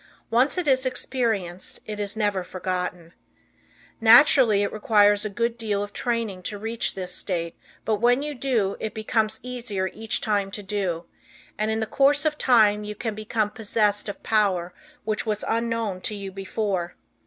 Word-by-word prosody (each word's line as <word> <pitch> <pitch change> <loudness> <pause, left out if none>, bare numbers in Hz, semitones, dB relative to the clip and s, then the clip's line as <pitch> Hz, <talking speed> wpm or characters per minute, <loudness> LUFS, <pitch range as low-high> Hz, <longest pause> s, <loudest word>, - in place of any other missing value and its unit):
Once 255 +9 +3
it 355 -4 -1
is 260 -1 +3
experienced 225 -9 -2
it 210 -1 -6
is 205 +1 -3
never 205 -3 0
forgotten. 180 -2 -4 0.9
Naturally 230 -2 +6
it 200 - -2
requires 205 -1 +3
a - - -1
good 230 +3 -2
deal 205 -3 -1
of 205 - -8
training 230 -6 -2
to 205 +3 -4
reach 225 +3 -1
this 185 -2 -3
state, 170 -3 -2 0.3
but 215 -1 +1
once 245 +6 +2
you 300 - -3
do, 235 -7 0
it 220 -2 -4
becomes 220 0 0
easier 230 -7 -3
each 220 0 -1
time 205 -3 0
to 205 +1 -7
do, 190 -4 -2 0.5
and 215 +1 -1
in 220 0 0
the - - 0
course 280 +6 +3
of 305 -1 +2
time 215 -7 +4
you 210 0 -6
can 220 +1 -3
become 215 0 -1
possessed 210 -2 0
of 205 - -8
power 190 -5 +1 0.3
which 215 0 -2
was 210 -1 -1
unknown 230 -4 -1
to 210 - -1
you 200 -1 -6
before. 190 -2 -3
215 Hz, 170 wpm, -24 LUFS, 200-230 Hz, 0.9 s, Naturally